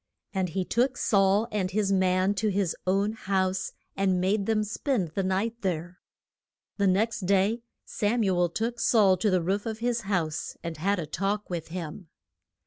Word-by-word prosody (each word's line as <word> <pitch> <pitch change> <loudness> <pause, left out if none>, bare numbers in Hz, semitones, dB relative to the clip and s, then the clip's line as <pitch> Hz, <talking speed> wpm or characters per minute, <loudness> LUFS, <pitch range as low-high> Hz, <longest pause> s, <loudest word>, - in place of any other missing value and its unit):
And 190 -2 0
he 185 +3 -2
took 250 +6 +1
Saul 200 +1 +3
and 195 -3 -1
his 200 0 0
man 185 0 +3
to 215 +2 -1
his 195 -3 0
own 195 +3 +2
house, 190 -3 -1 0.2
and 190 -2 +1
made 195 +2 +1
them 220 -1 +2
spend 210 - -1
the 180 +6 -2
night 195 +5 -1
there. 175 -1 -3 0.8
The 200 -1 +2
next 200 +1 +1
day 200 +4 +2 0.2
Sam 220 +3 0
u 190 -3 +2
el 175 0 +2
took 230 +6 -2
Saul 205 -6 +5
to 210 +4 +1
the 185 -3 +2
roof 200 +5 -1
of 220 -1 -3
his 235 +1 -1
house, 165 -6 -1
and 165 -2 -5
had 200 +6 +1
a 170 - -3
talk 195 +6 -2
with 165 -2 -3
him. 170 +1 -6
195 Hz, 180 wpm, -27 LUFS, 185-215 Hz, 0.8 s, Saul